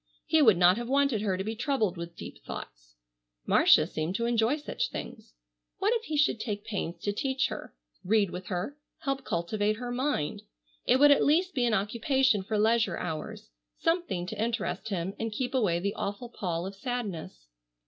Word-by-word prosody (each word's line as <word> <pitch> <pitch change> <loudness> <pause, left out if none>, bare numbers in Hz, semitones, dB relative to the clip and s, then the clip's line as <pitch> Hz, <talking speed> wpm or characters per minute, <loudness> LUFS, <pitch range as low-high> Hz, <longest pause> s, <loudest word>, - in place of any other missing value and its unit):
He 320 - +4
would 220 -10 +6
not 180 +2 +6
have 240 0 -4
wanted 275 -5 +2
her 195 -3 0
to 190 - -2
be 220 +2 -3
troubled 225 -6 0
with 170 0 -7
deep - - -10
thoughts. - - -9 0.5
Marcia - - +6
seemed 160 +4 -3
to 235 - 0
enjoy 235 +4 +2
such 295 - -3
things. - - -8 0.4
What 415 +4 +2
if 460 -1 -1
he 310 - -2
should 290 -6 +3
take 210 -2 -4
pains 200 -6 -3
to 205 - 0
teach 265 +4 0
her, - - -7 0.3
read 205 -1 +2
with 185 +1 -7
her, 195 +11 -3 0.2
help 275 -3 -2
cultivate 205 +3 0
her 245 +2 -5
mind? 250 - -1 0.5
It 255 - +5
would 290 +1 +8
at 285 - +5
least 350 +6 +3
be 245 -2 +1
an 225 - +2
occupation 235 +3 +2
for 210 +3 -2
leisure 220 -3 +2
hours, 155 - -5 0.3
something 330 - 0
to 210 +3 -5
interest 225 -1 -2
him 190 -1 -2
and 225 0 -2
keep 245 +4 -3
away 205 -10 +2
the 200 +3 -1
awful 205 +5 -4
pall 175 -6 -3
of 195 - -5
sadness. 195 - -5
220 Hz, 190 wpm, -29 LUFS, 185-260 Hz, 0.5 s, would